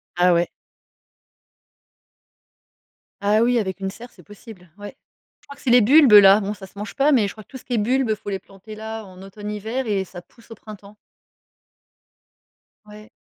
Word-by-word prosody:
Ah 175 0 +3
ouais. 170 +1 0 2.7
Ah 210 +2 +2
oui, 245 0 +2
avec 190 -2 -5
une 195 - -3
serre, 240 +4 -12
c'est - - -19
possible. 205 -3 -15
Ouais. 205 0 -10 0.5
Je - - -27
crois 280 - -12
que - - -19
c'est 255 - -1
les 245 - +6
bulbes-là. 210 -6 +7
Bon 200 0 -4
ça 200 -2 -11
se 190 - -25
mange 205 0 -7
pas. 290 +2 +2
Mais, 220 -6 +2
je - - -7
crois 215 - -14
que - - -51
tout - - -11
ce - - -19
qui 245 - -4
est - - +1
bulbes, 245 +2 0
il 215 - 0
faut 205 - -12
les 195 -1 -4
planter 195 +3 -14
là, 220 0 -7
en 185 -1 -14
automne-hiver 210 +5 -6
et 200 -3 -1
ça 175 -1 -11
pousse 230 +6 -24
au - - -8
printemps. 210 -1 -14 1.9
Ouais, 210 0 -14
210 Hz, 195 wpm, -21 LUFS, 195-230 Hz, 2.7 s, bulbes-là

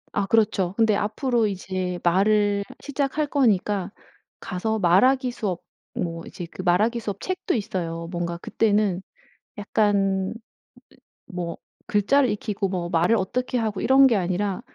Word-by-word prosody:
아 200 - 0
그렇죠. 195 -4 +2
근데 220 -2 +3
앞으로 225 +3 0
이제 185 -2 -3
말을 200 +3 +3 0.2
시작할 285 +1 -1
거니까 210 -8 +1 0.5
가서 220 +4 -2
말하기 250 +8 +4
수업, 195 -7 -3 0.3
뭐 165 -1 -4
이제 175 - -7
그 - - -7
말하기 210 +7 +2
수업 205 -3 -5
책도 370 0 -2
있어요. 175 -6 -3
뭔가 170 -1 -3
그때는 205 -1 +1 0.6
약간 200 -2 +1 0.9
뭐 175 -2 -5 0.3
글자를 245 +5 +3
익히고 205 -1 -2
뭐 180 -2 -3
말을 175 +6 +3
어떻게 250 +6 -2
하고 220 -4 -1
이런 270 +1 +6
게 240 -4 +3
아니라 190 +2 -1
205 Hz, 275 characters per minute, -24 LUFS, 180-225 Hz, 0.9 s, 이런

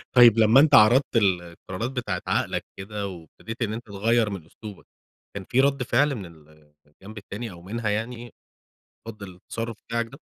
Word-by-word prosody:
طيّب 120 -3 +8
لمّا 110 +4 +6
أنت 150 0 +6
عرضت 120 +5 +5
القرارات 95 +2 -1
بتاعة 120 -8 -3
عقلك - - -1
كده، 100 +1 -5
وابتديت 95 - -10
إن 110 -2 -1
أنت 115 +2 -6
تغيّر 110 +2 +1
من 95 -6 -7
أسلوبك، 105 +4 -12 0.5
كان 100 -1 -6
في 130 - +3
رد 140 -1 +1
فعل 140 +4 +2
من 100 -5 -7 0.6
الجنب 100 +9 -14
التاني 105 +2 -7
أو 85 -1 -12
منها 110 +4 -3
يعني 115 +3 -4 0.7
رد 110 -2 -8
للتصرف 110 +5 -6
بتاعك 115 0 -1
ده؟ - - -14
110 Hz, 160 wpm, -25 LUFS, 100-120 Hz, 0.7 s, طيّب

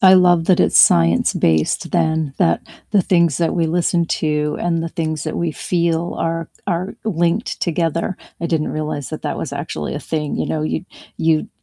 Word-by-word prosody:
I 190 -1 +8
love 175 -2 +5
that 185 - +4
it's - - +4
science 85 0 +5
based 80 -2 +1
then 160 -3 0
that 85 - +2 0.3
the 200 -3 +4
things 170 -5 +2
that 170 -1 +1
we 170 -2 +1
listen 170 +1 +1
to, 150 -2 -1
and 165 -1 0
the 165 - -3
things 155 -3 -3
that 155 - -3
we 170 -1 0
feel 170 +1 -1
are 165 0 -2 0.2
are 180 0 -2
linked 175 +1 0
together. 165 +1 -1 0.2
I 170 - -1
didn't 160 -2 0
realize 150 -3 -3
that - - -6
that - - -3
was - - -4
actually 75 -1 -4
a 145 - -4
thing, 150 -2 -3
you - - -1
know, 155 - -2
y 155 - -2 0.3
you 160 -1 +1
165 Hz, 190 wpm, -19 LUFS, 155-175 Hz, 0.3 s, I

